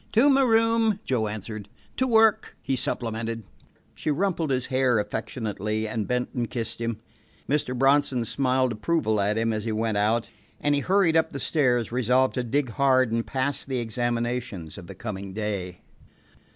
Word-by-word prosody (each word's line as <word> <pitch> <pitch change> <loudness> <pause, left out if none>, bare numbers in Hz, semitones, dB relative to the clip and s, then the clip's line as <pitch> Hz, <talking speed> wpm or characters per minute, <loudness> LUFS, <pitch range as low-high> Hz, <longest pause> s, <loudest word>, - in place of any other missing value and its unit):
"To 265 +6 +5
my 275 0 +4
room," 225 -3 +3
Joe 115 -5 0
answered. 105 0 -6 0.3
"To 260 - +2
work," 225 -2 +3
he 135 - 0
supplemented. 115 -2 -3 0.5
She - - -4
rumpled 165 0 0
his 130 -2 0
hair 130 -2 +2
affectionately, 105 0 -3
and 110 -1 -3
bent 125 0 -1
and 120 -2 -2
kissed 115 -1 -4
him. 115 -2 -2 0.5
Mr. 135 -3 0
Bronson 135 -2 +3
smiled 130 +1 +1
approval 110 -2 0
at 105 +2 +1
him 115 0 +1
as 110 -1 -2
he 115 - -1
went 110 -1 0
out, 110 +3 +1 0.3
and 145 - +1
he 140 - +1
hurried 185 -1 +3
up 160 - +3
the 140 - -6
stairs, 125 -9 +1
resolved 125 +2 +2
to 125 - -1
dig 130 +2 0
hard 130 -1 +3
and 115 0 -1
pass 135 +2 -1
the 135 -2 -3
examinations 120 -5 -2
of 95 -4 -10
the 95 - -9
coming 100 -2 -6
day. 100 -4 -4
120 Hz, 170 wpm, -26 LUFS, 110-140 Hz, 0.5 s, To